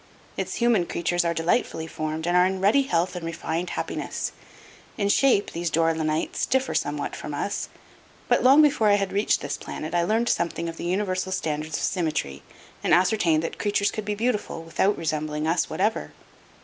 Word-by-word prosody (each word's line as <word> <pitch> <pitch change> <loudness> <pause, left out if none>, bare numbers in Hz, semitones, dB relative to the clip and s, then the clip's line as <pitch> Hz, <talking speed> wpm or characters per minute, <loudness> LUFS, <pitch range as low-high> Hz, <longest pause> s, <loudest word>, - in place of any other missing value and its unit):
Its - - -3
human 235 -7 +2
creatures 175 +1 0
are 170 - +1
delightfully 165 0 0
formed 155 0 -4
and 175 0 +1
are 180 +1 +6
in 190 0 -2
ruddy 205 +9 +4
health 180 -8 0
and 175 - -5
refined 165 +1 -3
happiness. - - -3 0.7
In 200 -3 0
shape 245 -2 +3
these 170 0 -2
Dore 165 +1 +2
lynites 155 -1 -1
differ 265 0 +1
somewhat 145 0 -2
from 150 - -6
us, 200 +7 -3 0.6
but - - +3
long 275 +4 +7
before 280 -7 +3
I 205 - +6
had 195 -1 -1
reached 205 +2 +2
this - - -3
planet 155 +2 -6
I 175 - +3
learned 220 +7 +1
something 170 0 -1
of 165 0 -6
the - - -5
universal 185 0 -1
standards 155 -4 -2
of - - -4
symmetry 155 - -1 0.4
and - - +5
ascertained 180 -4 +2
that - - -5
creatures 205 -1 +1
could 215 -2 -5
be 210 0 -1
beautiful 210 -6 -2
without 175 +5 +1
resembling 155 -1 -2
us 165 +2 +1
whatever. 210 +4 -1
175 Hz, 185 wpm, -25 LUFS, 160-205 Hz, 0.7 s, long